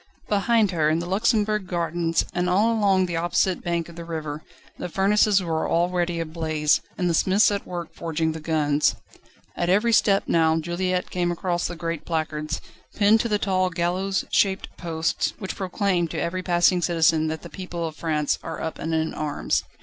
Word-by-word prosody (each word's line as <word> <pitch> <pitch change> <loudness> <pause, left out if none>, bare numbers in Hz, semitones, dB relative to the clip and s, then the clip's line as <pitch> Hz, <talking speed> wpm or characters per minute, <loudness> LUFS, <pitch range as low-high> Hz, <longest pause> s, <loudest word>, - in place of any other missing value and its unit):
Behind 210 0 +2
her, 155 -3 +2
in 155 - +2
the 170 - -3
Luxembourg 210 +1 +1
Gardens, 170 -1 0
and 180 +1 0
all 210 +6 +3
along 195 -4 +3
the 170 -2 -3
opposite 175 +2 +1
bank 170 -1 -1
of 170 - -12
the 170 - -7
river, 155 -3 -5 0.4
the - - -4
furnaces 200 +1 +3
were 160 -2 -1
already 175 0 +1
ablaze, 155 -2 0 0.2
and 180 - 0
the 170 - +1
smiths 195 +6 +4
at 200 -1 -3
work 175 -2 -6
forging 160 -1 -1
the 160 - -6
guns. 150 -2 +1 0.6
At 175 - -1
every 215 +5 +3
step 200 -2 +4
now 160 -1 +3
Juliette 180 +2 -2
came 175 -1 0
across 175 0 -1
the 175 - -6
great 165 -2 -4
placards, 155 -2 -3 0.3
pinned 210 +1 +5
to 235 - -1
the 210 - +2
tall 185 -2 +1
gallows 180 +3 -1
shaped 195 -1 +1
posts, 165 -2 -1
which 190 - -5
proclaim 185 -2 0
to - - -4
every 185 +2 -2
passing 175 0 +3
citizen, 160 -1 +2
that 155 0 -4
the - - -7
people 175 -3 -5
of 160 -1 -5
France 155 -3 -1
are 160 - -6
up 160 - -4
and 160 0 -2
in 160 0 -1
arms. 150 -2 -1
175 Hz, 185 wpm, -24 LUFS, 160-190 Hz, 0.6 s, pinned